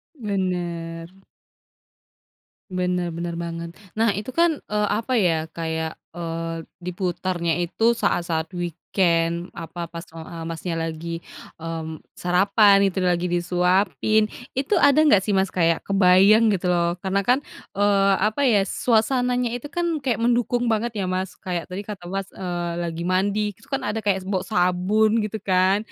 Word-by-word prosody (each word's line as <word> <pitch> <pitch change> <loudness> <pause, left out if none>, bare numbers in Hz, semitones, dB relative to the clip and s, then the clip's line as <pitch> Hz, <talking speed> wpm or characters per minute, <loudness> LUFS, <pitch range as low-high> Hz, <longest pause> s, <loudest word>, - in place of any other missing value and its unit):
Bener. 175 - -3 1.6
Bener 180 -1 -1
bener 170 +1 -4
banget. 170 0 -5 0.2
Nah, 225 -2 +3
itu 210 +5 -4
kan, 335 +1 +2
eee, 210 0 +1
apa 225 +5 -1
ya? 160 -4 +1
Kayak, 160 -1 -3 0.2
eee, 165 -1 -4 0.2
diputarnya 180 -1 -2
itu 225 +7 +2
saat-saat 165 -5 0
weekend, 170 0 0
apa 170 0 -6
pas, 170 +1 -7
eee, 160 0 -10
a 165 -1 -7
Mas 165 -1 -6
nya 170 -2 -2
lagi, 165 +1 -4 0.4
mmm, 160 -1 -5 0.2
sarapan, 195 +3 +4
itu 190 0 -3
lagi 180 0 +1
disuapin, 180 +3 +2 0.3
itu 280 +10 +1
ada 285 +1 +5
enggak 210 -10 +6
sih, 210 - 0
Mas, 190 0 +2
kayak 165 -2 +2
kebayang 195 +3 +5
gitu 180 -1 -1
loh, 170 0 +2
karena 195 +1 +1
kan, 255 +2 +5 0.4
eee, 200 -1 +3
apa 215 +7 0
ya 210 -5 +4
suasananya 245 +3 +1
itu 245 - -8
kan 340 -2 0
kayak 235 -4 0
mendukung 240 0 +1
banget 225 +2 -1
ya, 195 - -1
Mas, 185 0 -2
kayak 175 -2 -3
tadi 185 +3 -5
kata, 200 -4 -8
Mas, 195 0 -3
eee, 175 -2 -3
lagi 170 0 -4
mandi 200 +3 +1 0.2
terus 225 - -21
kan 270 -1 -1
ada 220 +1 -1
kayak 195 -2 +2
bau 190 -2 0
sabun 205 +3 +2
gitu 215 +1 -4
kan 185 +1 +3
185 Hz, 150 wpm, -23 LUFS, 170-210 Hz, 1.6 s, enggak